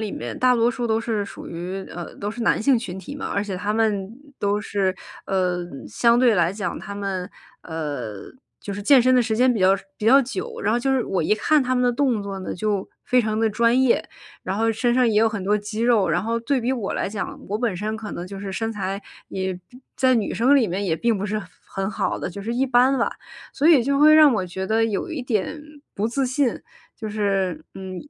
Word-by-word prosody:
里 215 -2 -3
面 - - -5
大 250 -1 +3
多 230 +1 +3
数 240 -1 -2
都 220 0 +1
是 225 -3 -1
属 - - -10
于， 180 +3 -5
呃， 175 -1 -7
都 205 - -4
是 235 0 -5
男 - - +2
性 265 +2 +4
群 190 -5 -5
体 280 +9 -8
嘛。 280 - -5
而 200 - 0
且 195 -3 -4
他 205 +3 -2
们 215 -3 0 0.3
都 205 +1 +1
是， 195 -3 0 0.3
呃 180 -2 0 0.2
相 235 - +3
对 245 -3 +5
来 175 0 +2
讲 195 -4 -3
他 200 -1 -7
们， 195 -3 -3 0.3
呃 145 -9 -4 0.5
就 200 - -5
是 205 - -6
健 270 +4 +6
身 255 +1 +4
的 250 - +5
时 220 -2 -1
间 250 0 +4
比 210 - -2
较 185 - +5 0.3
比 215 - -6
较 270 +5 +7
久。 380 - -5
然 - - +1
后 240 - +2
就 270 +2 0
是 255 -3 +1
我 185 -3 -1
一 160 - +1
看 290 +7 +3
他 255 0 0
们 250 - +2
的 245 - +3
动 245 -4 +1
作 195 -1 -5
呢， - - -4
就 205 0 -2 0.2
非 250 -1 +3
常 215 0 -1
地 225 0 +2
专 235 +4 +3
业， 260 -2 +3 0.4
然 190 +3 -3
后 225 0 +2
身 240 +2 +1
上 250 -1 +3
也 215 - 0
有 225 +1 +4
很 205 -4 -5
多 210 +2 +3
肌 210 +2 -4
肉， 225 -7 +3
然 175 - +2
后 230 +1 -1
对 265 +2 0
比 245 +3 0
我 235 -7 -3
来 - - -1
讲， 205 0 -5
我 210 - -1
本 225 -5 -1
身 215 +3 -3
可 215 -1 -7
能 175 - -6
就 195 +1 -8
是 200 - -5
身 225 +4 -2
材， 195 -1 -3 0.3
也 190 -1 -3
并 250 +1 -16
在 260 -1 +3
女 220 - -1
生 265 +5 +4
里 245 - +3
面 195 +3 -2
也 165 -3 0
并 235 +2 +1
不 195 - -3
是 210 +1 -1
很 190 - -8 0.3
很 195 +1 0
好 - - -2
的， - - -3
就 200 +3 -8
是 230 +3 -3
一 260 +3 +1
般 255 +1 +4
吧。 230 - +2 0.4
所 305 - +2
以 290 -8 +7
就 280 0 +1
会 305 +1 +7
让 305 -3 +7
我 190 - 0
觉 190 +2 -5
得 225 +2 +2
有 225 - -2
一 315 -5 -4
点 250 +6 -2 0.3
不 205 - -1
自 265 +2 0
信。 255 -1 0 0.4
就 220 -2 -5
是， 195 -6 -1
嗯， 190 -1 -7
215 Hz, 265 characters per minute, -23 LUFS, 195-245 Hz, 0.5 s, 较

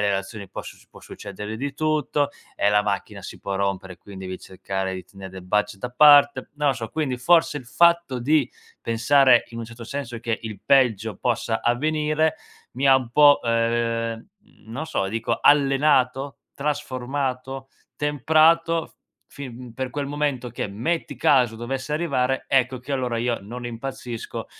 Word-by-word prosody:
relazioni 100 0 -2
posso - - -8
può - - -16
succedere 105 +2 -8
di 140 +3 -4
tutto, 155 -2 0 0.3
e 100 - +1
la 105 0 +3
macchina 100 -1 -3
si - - -9
può 100 -1 -3
rompere, 95 -2 -2
quin 100 +1 -12
devi 95 -1 -6
cercare 95 0 -4
di 95 - -6
tenere 95 -4 -11
del 95 0 -10
budget 105 +2 -1
da 125 - -4
parte". 145 +2 +6
Non 150 -1 0
lo 135 - +2
so, 115 -1 -6
quindi, 140 -1 -2
forse 165 +2 +3
il 130 - -7
fatto 170 -1 +3
di 145 +1 +2 0.3
pensare, 120 +2 +4
in 115 - -9
un 115 - -4
certo 115 +1 -11
senso, 120 -1 -6
che 115 -1 -2
il 110 -3 -7
peggio 115 -6 +2
possa 115 -2 -1
avvenire, 155 +5 +1 0.4
mi 135 +3 0
ha 135 - +7
un 130 -3 0
po', 145 +2 +6
ehm, 115 -1 0 0.4
non 130 +8 -5
so, 95 -10 -1
dico 115 +2 -1
allenato, 135 -1 +3 0.2
trasformato, 135 -2 -3 0.3
temprato, 160 +3 +3
f - - -26 0.4
fin 125 -3 -9
per 130 0 -4
quel 145 0 -3
momento 145 -3 -2
che, 120 - -4
metti 155 +12 -2
caso 125 -5 +3
dovesse 130 +5 -4
arrivare, 135 -5 0
ecco 130 -1 +2
che 130 +3 -12
allora 125 -3 -1
io 120 0 0
non 120 +5 -8
impazzisco, 120 0 -6
125 Hz, 160 wpm, -23 LUFS, 115-145 Hz, 0.4 s, ha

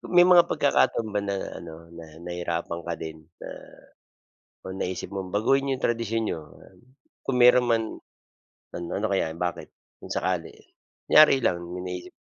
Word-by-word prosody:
May 175 - +9
mga 180 -1 +6
pagkakataon 140 -6 +2
ba 105 - 0
na 100 -1 -2 0.2
ano 85 0 -11
na 85 -1 -10 0.2
nahirapan 85 -1 -3
ka 85 - -1
din 80 -1 -9
na, - - -7 1.1
kung 95 0 -7
naisip 95 -1 -3
mong 95 -2 -5
baguhin 135 +6 +2
'yong 130 - -3
tradisyon 115 -1 0
niyo, 80 - -3 0.8
kung 135 - -1
mayro'n 125 0 +6
man, 115 -1 +2 0.9
ano 85 -1 -5
ano 105 - -1
kaya 85 -5 0
bakit, 90 -1 -3 0.3
kung - - -10
sakali? - - -1 0.5
Kunyari 150 -3 +7
lang 85 -1 +1
may 90 0 -6
naisip 90 0 -6
95 Hz, 150 wpm, -26 LUFS, 85-120 Hz, 1.1 s, May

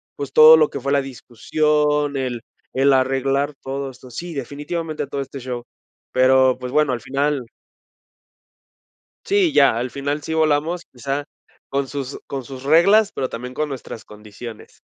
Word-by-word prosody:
pues, 140 -2 -6
todo 155 +3 +9
lo 155 -2 +3
que 140 - -5
fue 140 +2 -2
la 140 - +3
discusión, 150 +3 0
el 125 -3 -3 0.3
el 135 +1 +3
arreglar 135 +2 +1
todo 135 +1 -4
esto, 130 -1 -14
sí, 170 +8 -6
definitivamente 150 +4 -4
todo 140 0 -3
este 135 0 -7
show, 125 -1 -5 0.5
pero, 130 0 +4
pues 125 0 -6
bueno, 150 -2 +2
al 120 - -4
final 140 +1 -1 1.8
sí, 390 -6 +2
ya, 140 -5 +5
al 125 +2 -2
final 140 +3 -3
sí 160 - -4
volamos, 160 +2 +1
quizá 135 +3 -3 0.5
con 140 0 -1
sus 140 -1 -5
con 135 -1 -4
sus 130 +1 -9
reglas, 195 +9 +5
pero 130 - -2
también 125 +2 -7
con 155 +3 -2
nuestras 125 -4 -7
condiciones. 105 +2 -11
140 Hz, 155 wpm, -21 LUFS, 130-150 Hz, 1.8 s, todo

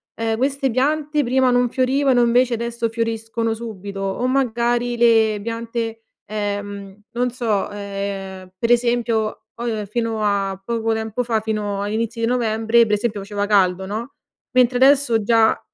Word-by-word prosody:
"Ehm 225 -1 -1
queste 270 +1 0
piante 300 +4 +1
prima 255 0 +2
non 245 0 +2
fiorivano 260 0 +2
invece 240 +1 +3
adesso 235 0 -2
fioriscono 225 0 -2
subito." 205 -4 -7
O 195 +5 -2
magari 240 -2 +1
le 225 -3 +4
piante, 230 0 -4 0.2
ehm, 205 -1 -5
non 245 +1 0
so, 225 -5 -1
ehm, 195 -2 -6
per 230 +4 0
esempio 235 -3 +1
po 230 -3 -3
fino 225 0 -2
a 195 -2 0
poco 225 +1 -1
tempo 220 +2 -2
fa, 230 -2 0
fino 210 -2 -2
agli 205 +1 -3
inizi 230 +1 -2
di 230 - +1
novembre 230 -1 +2
per 210 - -1
esempio 210 -1 -2
faceva 205 +1 -3
caldo 190 -2 +2
no, 230 +7 -5 0.4
mentre 250 -1 +3
adesso 265 -4 +4
già 225 +1 +3
230 Hz, 150 wpm, -21 LUFS, 210-240 Hz, 0.4 s, le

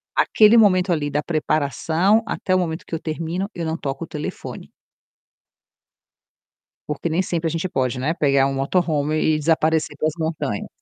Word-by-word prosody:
Aquele 220 +2 +5
momento 185 -4 +4
ali 150 -3 -1
da 145 +1 -1
preparação 160 - +1
até 185 -2 -1
o - - +4
momento 165 -3 -3
que - - -6
eu 160 - -3
termino 165 +4 -3
eu 170 - -4
não 160 0 -2
toco 135 +1 -4
o - - -9
telefone. 155 -2 -7 2.2
Porque 150 +3 -2
nem 165 +3 +1
sempre 170 -2 -2
a - - -2
gente 170 +3 -2
pode, 130 -4 -1
né, 145 +6 -1
pegar 140 -4 +3
um 135 - -2
motorhome 150 +1 0 0.2
e - - 0
desaparecer 155 0 +1
para 155 - -1
as 155 - -4
montanhas. 155 -9 -3
160 Hz, 170 wpm, -22 LUFS, 145-175 Hz, 2.2 s, Aquele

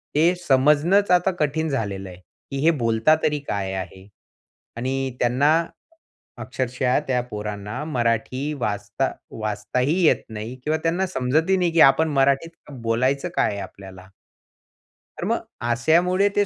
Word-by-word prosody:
ते 165 +4 +4
समजणंच 150 +9 +4
आता 180 +1 +4
कठीण 155 +2 0
झालेलं 100 -7 -3
आहे, 90 - -11 0.3
की 135 - -3
हे 165 - +6
बोलता 115 +6 +3
तरी 150 -1 +1
काय 95 -1 -2
आहे? 95 +1 -7 0.7
आणि 130 +1 -2
त्यांना 130 +5 +3 0.9
अक्षरशः 125 +2 -1
त्या 125 -2 +1
पोरांना 105 +4 -5
मराठी 130 +2 -1
वाचता 105 +4 -2 0.3
वाचताही 110 - -1
येत - - +4
नाही 110 +3 -6
किंवा 155 +1 0
त्यांना 175 +3 +1
समजतही 160 +5 +1
नाही, 175 -2 +1
की 165 - +1
आपण 155 +4 +5
मराठीत 140 +3 0
बोलायचं 130 +6 -1
काय - - +2
आहे 100 - -5
आपल्याला. 95 -1 -11 1.1
तर - - -4
मग - - 0 0.3
अशामुळे 175 +11 +3
ते 205 0 +3
130 Hz, 135 wpm, -23 LUFS, 110-155 Hz, 1.1 s, हे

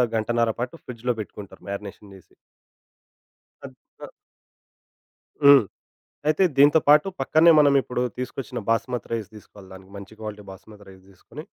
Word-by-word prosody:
గంటన్నర 115 +1 0
పాటు 125 +5 -4
ఫ్రిడ్జ్‌లో 125 0 -4
పెట్టుకుంటారు 105 -1 -10
మ్యారినేషన్ 100 0 -8
జేసి. 95 - -20 1.3
అద్ధ్ - - -16 0.3
ఆహ్ - - -16 1.3
హ్మ్. 140 -4 +8 0.6
అయితే 155 +5 +2
దీంతో 145 +3 +6
పాటు 150 +5 +5
పక్కనే 165 +2 +4
మనమిప్పుడు 140 -4 +2
తీసుకొచ్చిన 130 0 -6
బాస్మతి 120 +2 -2
రైస్ 110 -3 -4
దీసుకోవాలి 100 -2 -15
దానికి 95 0 -15
మంచి 100 +2 -12
క్వాలిటీ 105 -1 -8
బాస్మతి 100 +2 -15
రైస్ 95 -1 -17
దీసుకొని... 95 - -13
115 Hz, 125 wpm, -23 LUFS, 100-135 Hz, 1.3 s, హ్మ్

